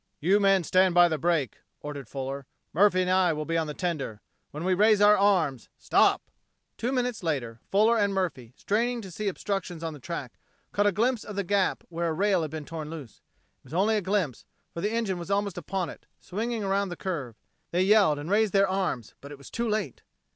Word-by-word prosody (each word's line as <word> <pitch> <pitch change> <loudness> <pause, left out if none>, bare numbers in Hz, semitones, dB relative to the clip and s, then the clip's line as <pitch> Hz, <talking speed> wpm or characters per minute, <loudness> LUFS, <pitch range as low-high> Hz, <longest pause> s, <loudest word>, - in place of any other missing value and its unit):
"You 190 +6 +3
men 195 -2 +4
stand 185 +1 +3
by 175 0 +7
the 160 -2 -2
brake," 165 -5 0 0.2
ordered 145 -4 -7
Fuller. 135 0 -5 0.3
"Murphy 185 +1 +4
and 180 - 0
I 185 -2 +3
will 155 0 -4
be 165 - -2
on 165 -1 +1
the 150 - -5
tender. 155 - -3 0.3
When 150 +3 -7
we 185 +1 +2
raise 210 +2 +4
our 205 0 +7
arms 175 - +1
stop!" - - +3 0.5
Two 245 - -2
minutes 250 -3 -1
later, 130 -9 -2
Fuller 220 +4 +4
and 200 -1 +2
Murphy, 165 -12 -2
straining 235 +3 0
to 190 -3 -9
see 210 +5 -4
obstructions 190 -3 -3
on 165 -1 -3
the 150 - -10
track, 135 -3 -6 0.3
caught 205 0 +2
a - - +4
glimpse 230 +4 0
of 210 - -8
the 200 - -1
gap 195 +1 +1
where 170 0 -2
a - - -1
rail 190 +1 +2
had 155 - -3
been 155 0 -6
torn 155 -1 -6
loose. 150 -8 -9 0.4
It - - -36
was - - -13
only 210 +4 +3
a 210 - +1
glimpse, 185 - -1 0.3
for 170 - -5
the 210 - 0
engine 220 -6 -1
was 170 - -7
almost 200 -1 0
upon 180 +2 -3
it, - - -11
swinging 225 +3 -3
around 195 0 0
the 175 - -6
curve. 145 - -4 0.3
They 180 +2 +1
yelled 195 -6 +5
and 150 +5 -5
raised 210 -1 +3
their 195 0 +4
arms, 185 - -2
but 140 - -10
it 145 - -8
was 140 - -13
too 235 0 -1
late. 215 0 -2
185 Hz, 220 wpm, -27 LUFS, 155-205 Hz, 0.5 s, by